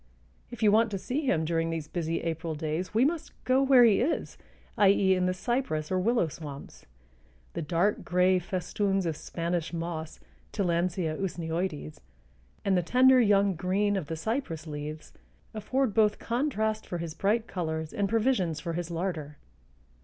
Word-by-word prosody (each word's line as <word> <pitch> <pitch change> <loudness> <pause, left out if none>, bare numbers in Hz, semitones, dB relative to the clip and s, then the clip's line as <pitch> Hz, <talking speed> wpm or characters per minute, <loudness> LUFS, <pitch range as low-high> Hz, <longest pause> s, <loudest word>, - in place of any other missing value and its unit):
If 240 -3 -6
you 210 - +6
want 225 +2 +4
to 200 - -3
see 270 +9 -3
him 160 -8 +2
during 165 0 0
these 165 -2 -3
busy 165 0 -2
April 165 -1 -3
days 155 +4 -3
we 225 +4 +3
must 320 +2 -2
go 260 +1 +3
where 265 -2 +6
he 220 -4 +5
is, 285 +7 -1 0.4
i. 205 -2 +5
e., 195 -1 +4
in 185 -1 +1
the - - +2
cypress 190 - -2
or 185 - +2
willow 230 -1 +2
swamps. 145 -2 -10 0.7
The 170 - -3
dark 170 +6 0
gray 180 +1 +3
festoons 195 +2 -1
of 165 -2 -1
Spanish 170 +1 -3
moss 165 -1 -5 0.3
(Tillandsia 175 -4 0
usneoides) 165 -3 -3 0.7
and 195 -1 +3
the 180 - +3
tender 255 +7 +5
young 200 -3 +4
green 195 +4 0
of 185 -7 -3
the 160 - -3
cypress 170 - -3
leaves 150 0 -7 0.4
afford 220 +2 -1
both 210 -1 +3
contrast 220 -4 -1
for 175 - -3
his 165 -2 -5
bright 210 +7 +1
colors 160 -5 -4
and 200 -1 0
provisions 215 - +1
for 165 +2 -4
his 175 0 -3
larder. 165 -4 -4
185 Hz, 165 wpm, -28 LUFS, 165-215 Hz, 0.7 s, you